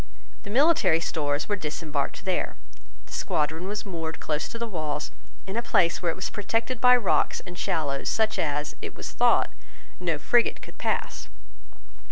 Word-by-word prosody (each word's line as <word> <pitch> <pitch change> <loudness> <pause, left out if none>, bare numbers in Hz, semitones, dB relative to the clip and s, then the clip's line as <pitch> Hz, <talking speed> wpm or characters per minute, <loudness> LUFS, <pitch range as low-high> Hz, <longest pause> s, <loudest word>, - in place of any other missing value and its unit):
The - - -9
military 270 - +4
stores 145 -3 -1
were 205 - +1
disembarked 150 -2 -3
there. 185 -1 0 0.5
The - - -13
squadron 160 +4 -1
was 205 +1 -3
moored 165 -4 -4
close 150 -1 -1
to 230 - -6
the 235 - -2
walls 155 -8 -3 0.3
in 190 - -5
a 235 - +1
place 170 -7 +3
where 175 -2 +2
it - - -5
was 185 - -3
protected 225 +4 -1
by 250 0 +8
rocks 225 -6 +2
and 180 - -8
shallows 145 -6 -1
such 220 -1 +1
as, 150 -1 -1
it - - -6
was - - -6
thought, - - +3 0.5
no 170 -4 0
frigate 235 +11 +3
could - - -13
pass. - - -2
175 Hz, 170 wpm, -27 LUFS, 155-215 Hz, 0.5 s, by